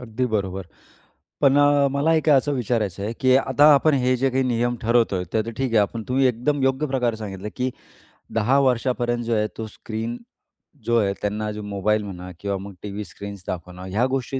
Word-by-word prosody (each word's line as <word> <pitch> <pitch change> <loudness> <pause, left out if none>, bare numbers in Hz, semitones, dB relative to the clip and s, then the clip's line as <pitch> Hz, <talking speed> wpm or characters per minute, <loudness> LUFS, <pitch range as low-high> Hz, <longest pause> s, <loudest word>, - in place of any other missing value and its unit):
अगदी 125 +1 -2
बरोबर. 95 -4 -2 0.7
पण 140 0 +5
अ, 145 -1 +4
मला 145 +4 +2
एक 155 0 +1
असं 145 +1 +4
विचारायचं 110 -7 -1
आहे, 110 +3 -2
की 130 0 +4
आता 135 +1 +3
आपण 150 +2 +3
हे 130 -1 +2
जे 135 +2 +1
काही 130 +1 +1
नियम 120 0 0
ठरवतोय 115 -5 +2
ते 110 - +2
तर - - -3
ठीक 135 -2 -1
आहे. 115 - +3
आपण 110 +2 -1
तुम्ही 130 +1 +3
एकदम 130 +4 0
योग्य 135 +3 +1
प्रकारे 125 -4 0
सांगितलं, 105 -1 -6
की 130 +1 0 0.6
10 120 +5 +3
वर्षापर्यंत 120 -2 0
जो 115 0 0
आहे 105 0 +1
तो 110 - -4
स्क्रीन 110 +2 -5 0.7
जो 120 0 +2
आहे, 100 -2 +1
त्यांना 105 +1 -2
मोबाईल 105 +1 0
म्हणा 90 -2 -8
किंवा 100 -1 -2
मग 100 +1 -8
टीव्ही 105 0 -5
स्क्रीन्स 100 0 -9
दाखवणं, 90 0 -6
ह्या 105 +6 0
गोष्टी 130 0 -2
120 Hz, 190 wpm, -23 LUFS, 105-130 Hz, 0.7 s, पण